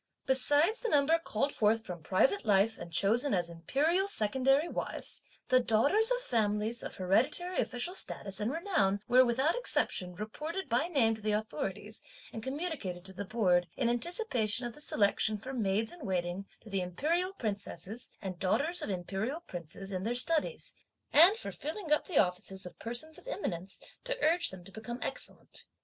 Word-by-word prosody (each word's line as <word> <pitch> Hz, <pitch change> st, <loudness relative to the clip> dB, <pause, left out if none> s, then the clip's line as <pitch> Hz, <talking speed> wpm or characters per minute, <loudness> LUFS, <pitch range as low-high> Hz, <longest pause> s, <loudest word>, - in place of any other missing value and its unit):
Besides 290 Hz, -, +4 dB
the 475 Hz, -, -2 dB
number 300 Hz, +2 st, +4 dB
called 280 Hz, -2 st, -1 dB
forth 220 Hz, +1 st, +2 dB
from 175 Hz, -2 st, -6 dB
private 195 Hz, -, +2 dB
life 210 Hz, +1 st, +3 dB
and 170 Hz, -, -8 dB
chosen 225 Hz, -, +2 dB
as 175 Hz, -2 st, -1 dB
Imperial 295 Hz, -, +1 dB
secondary 270 Hz, -, +2 dB
wives, -, -, -5 dB, 0.3 s
the 255 Hz, -, +6 dB
daughters 280 Hz, -, +4 dB
of -, -, 0 dB
families 220 Hz, -, 0 dB
of -, -, -6 dB
hereditary 250 Hz, -, +1 dB
official 250 Hz, +8 st, -1 dB
status 195 Hz, -, -1 dB
and 215 Hz, +3 st, 0 dB
renown 280 Hz, -, +1 dB
were 255 Hz, +1 st, +7 dB
without 260 Hz, +6 st, +2 dB
exception, 180 Hz, -, 0 dB
reported 305 Hz, -, -5 dB
by 255 Hz, +6 st, +1 dB
name 260 Hz, -10 st, +3 dB
to 220 Hz, -, -8 dB
the 210 Hz, 0 st, 0 dB
authorities, 215 Hz, -1 st, -3 dB, 0.3 s
and 225 Hz, -, -5 dB
communicated 265 Hz, -, -4 dB
to 190 Hz, -, -5 dB
the 200 Hz, +2 st, -5 dB
Board, 185 Hz, -5 st, +2 dB
in 240 Hz, -3 st, +1 dB
anticipation 245 Hz, -, 0 dB
of 240 Hz, -, -5 dB
the 295 Hz, -, -11 dB
selection 215 Hz, -3 st, +2 dB
for 260 Hz, +6 st, -7 dB
maids 220 Hz, -2 st, 0 dB
in 350 Hz, -4 st, -11 dB
waiting 185 Hz, 0 st, -2 dB
to 215 Hz, -, -13 dB
the 195 Hz, -1 st, 0 dB
Imperial 320 Hz, -, -1 dB
Princesses 215 Hz, -, -5 dB
and 185 Hz, -3 st, -5 dB
daughters 290 Hz, -, +1 dB
of -, -, -4 dB
Imperial 195 Hz, -, -3 dB
Princes 180 Hz, -, -8 dB
in 185 Hz, -1 st, -2 dB
their 230 Hz, +5 st, -1 dB
studies, 330 Hz, -, 0 dB, 0.4 s
and 350 Hz, +8 st, +8 dB
for -, -, -6 dB
filling 320 Hz, +2 st, -6 dB
up 300 Hz, -, +3 dB
the 350 Hz, -, -1 dB
offices 190 Hz, 0 st, +1 dB
of 180 Hz, -, -10 dB
persons 310 Hz, +9 st, -4 dB
of 420 Hz, -, -18 dB
eminence, 190 Hz, -, -4 dB, 0.2 s
to -, -, -1 dB
urge 345 Hz, +2 st, +3 dB
them 190 Hz, -2 st, -10 dB
to 195 Hz, -, -14 dB
become 225 Hz, +3 st, -6 dB
excellent. -, -, -5 dB
230 Hz, 175 wpm, -32 LUFS, 195-310 Hz, 0.4 s, and